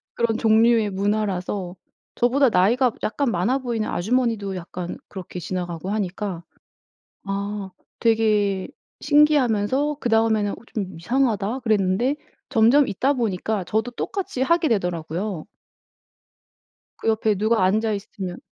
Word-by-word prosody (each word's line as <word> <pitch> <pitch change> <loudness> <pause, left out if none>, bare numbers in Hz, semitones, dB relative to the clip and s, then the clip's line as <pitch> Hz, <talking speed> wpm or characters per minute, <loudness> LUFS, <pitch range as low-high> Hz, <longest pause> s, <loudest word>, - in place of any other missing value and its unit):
그런 230 -1 +1
종류의 225 -1 +4
문화라서 195 -2 -2 0.4
저보다 255 +2 +3
나이가 235 +7 +3
약간 270 +3 0
많아보이는 230 +4 0
아주머니도 220 -1 0
약간 175 0 -6
그렇게 185 -2 -7
지나가고 175 0 -4
하니까 195 -3 -3 0.8
아 200 0 -4 0.3
되게 210 -4 +2 0.3
신기하면서 285 -2 +3
그다음에는 225 -3 +2
'어 - - -5 0.2
좀 195 -6 -4
이상하다.' 235 +1 0
그랬는데 215 +4 +1 0.3
점점 260 +3 +5
있다 255 +8 +1
보니까 215 -4 -1
저도 220 +6 -1
똑같이 360 - -4
하게 335 +4 +3
되더라고요. 180 -2 -2 1.5
그 - - -3
옆에 220 -1 +2
누가 215 0 +2
앉아 215 +4 +2
있으면 195 -3 -5
215 Hz, 295 characters per minute, -23 LUFS, 190-240 Hz, 1.5 s, 점점